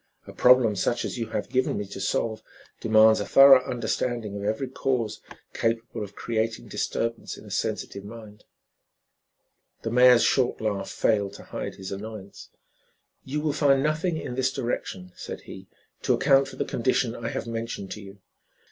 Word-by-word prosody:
A -, -, -11 dB
problem 125 Hz, -4 st, +5 dB
such 120 Hz, +5 st, 0 dB
as -, -, -4 dB
you 115 Hz, -, -2 dB
have 110 Hz, -, -3 dB
given 130 Hz, 0 st, 0 dB
me 105 Hz, -, -3 dB
to 95 Hz, 0 st, -8 dB
solve 110 Hz, +3 st, -1 dB, 0.4 s
demands 110 Hz, 0 st, +5 dB
a 105 Hz, -, -2 dB
thorough 135 Hz, -1 st, +8 dB
understanding 120 Hz, -3 st, -2 dB
of 100 Hz, -, -5 dB
every 110 Hz, +6 st, -1 dB
cause 125 Hz, -4 st, -2 dB, 0.3 s
capable 115 Hz, -1 st, -2 dB
of 100 Hz, 0 st, -10 dB
creating 115 Hz, 0 st, -2 dB
disturbance 115 Hz, 0 st, -3 dB
in -, -, -13 dB
a -, -, -11 dB
sensitive 100 Hz, -, -3 dB
mind." 105 Hz, -1 st, -11 dB, 1.4 s
The 115 Hz, -, -2 dB
mayor's 125 Hz, 0 st, +6 dB
short 130 Hz, -3 st, +2 dB
laugh 100 Hz, -3 st, -2 dB
failed 100 Hz, -3 st, +1 dB
to -, -, -11 dB
hide -, -, -6 dB
his 95 Hz, -1 st, -8 dB
annoyance. 100 Hz, 0 st, -8 dB, 0.8 s
"You 150 Hz, +3 st, -2 dB
will 150 Hz, -1 st, 0 dB
find 140 Hz, -2 st, +3 dB
nothing 155 Hz, +3 st, 0 dB
in 125 Hz, -, -5 dB
this 130 Hz, +1 st, 0 dB
direction," 115 Hz, -8 st, -4 dB
said -, -, -7 dB
he, -, -, -11 dB, 0.3 s
"to -, -, +2 dB
account 135 Hz, -1 st, +4 dB
for -, -, -10 dB
the -, -, -2 dB
condition 125 Hz, -1 st, 0 dB
I 115 Hz, -, -5 dB
have -, -, -4 dB
mentioned 115 Hz, -4 st, -5 dB
to 105 Hz, -, -6 dB
you. 100 Hz, 0 st, -13 dB
115 Hz, 170 wpm, -26 LUFS, 105-130 Hz, 1.4 s, thorough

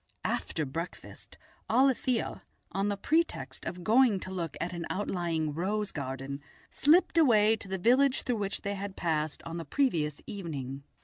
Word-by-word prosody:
After 155 Hz, -, -1 dB
breakfast 165 Hz, +6 st, -7 dB, 0.3 s
Alethia, 255 Hz, -2 st, +2 dB, 0.3 s
on 195 Hz, +1 st, 0 dB
the 205 Hz, -, -1 dB
pretext 320 Hz, +11 st, 0 dB
of 180 Hz, 0 st, -5 dB
going 225 Hz, -1 st, +5 dB
to 185 Hz, -, -6 dB
look 170 Hz, -5 st, -4 dB
at 180 Hz, +2 st, -2 dB
an 170 Hz, -1 st, -4 dB
outlying 170 Hz, -6 st, -1 dB
rose 205 Hz, +5 st, -1 dB
garden, 135 Hz, 0 st, -5 dB, 0.3 s
slipped 335 Hz, +3 st, +4 dB
away 220 Hz, -7 st, +5 dB
to 210 Hz, -, -6 dB
the 190 Hz, 0 st, -2 dB
village 255 Hz, +7 st, +3 dB
through 245 Hz, -3 st, 0 dB
which 200 Hz, -1 st, -3 dB
they 200 Hz, -1 st, -1 dB
had 200 Hz, 0 st, -5 dB
passed 155 Hz, -3 st, -1 dB
on 165 Hz, +1 st, -5 dB
the 165 Hz, -, -4 dB
previous 155 Hz, -, 0 dB
evening. 140 Hz, -9 st, -5 dB
190 Hz, 160 wpm, -30 LUFS, 160-225 Hz, 0.3 s, going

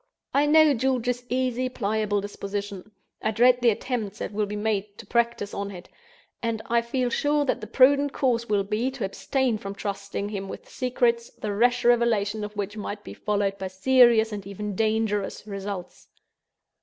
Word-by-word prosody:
I 285 Hz, +2 st, +3 dB
know 310 Hz, -1 st, +6 dB
George's 250 Hz, -1 st, 0 dB
easy, 255 Hz, 0 st, 0 dB
pliable 210 Hz, -3 st, -1 dB
disposition; 200 Hz, 0 st, -5 dB, 0.3 s
I -, -, 0 dB
dread 245 Hz, +3 st, +4 dB
the 240 Hz, -, +5 dB
attempts 220 Hz, -2 st, -2 dB
that -, -, -4 dB
will 210 Hz, 0 st, 0 dB
be 210 Hz, -, -5 dB
made 205 Hz, -1 st, -2 dB
to 230 Hz, -, -10 dB
practice 235 Hz, -2 st, 0 dB
on 200 Hz, 0 st, -3 dB
it; 180 Hz, -3 st, -10 dB, 0.5 s
and 230 Hz, -1 st, -1 dB
I 235 Hz, 0 st, +2 dB
feel 245 Hz, +1 st, -1 dB
sure 290 Hz, +3 st, +1 dB
that 260 Hz, -, 0 dB
the 215 Hz, -, -6 dB
prudent 280 Hz, +4 st, +4 dB
course 240 Hz, -5 st, 0 dB
will 205 Hz, -2 st, +2 dB
be, 215 Hz, +5 st, -1 dB
to 260 Hz, -6 st, -4 dB
abstain 245 Hz, +3 st, -1 dB
from 195 Hz, 0 st, -6 dB
trusting 200 Hz, 0 st, -4 dB
him 195 Hz, -2 st, -5 dB
with -, -, -8 dB
secrets, 240 Hz, -2 st, 0 dB
the 210 Hz, -1 st, -5 dB
rash 245 Hz, +3 st, +2 dB
revelation 225 Hz, -3 st, +2 dB
of 210 Hz, 0 st, -6 dB
which 205 Hz, 0 st, -3 dB
might 205 Hz, -1 st, -5 dB
be -, -, -9 dB
followed 200 Hz, -1 st, -1 dB
by 190 Hz, -, -3 dB
serious, 230 Hz, +3 st, +4 dB
and 200 Hz, -2 st, -6 dB
even 205 Hz, +1 st, -5 dB
dangerous 215 Hz, -2 st, 0 dB
results. 195 Hz, -3 st, -6 dB
220 Hz, 175 wpm, -25 LUFS, 205-245 Hz, 0.5 s, know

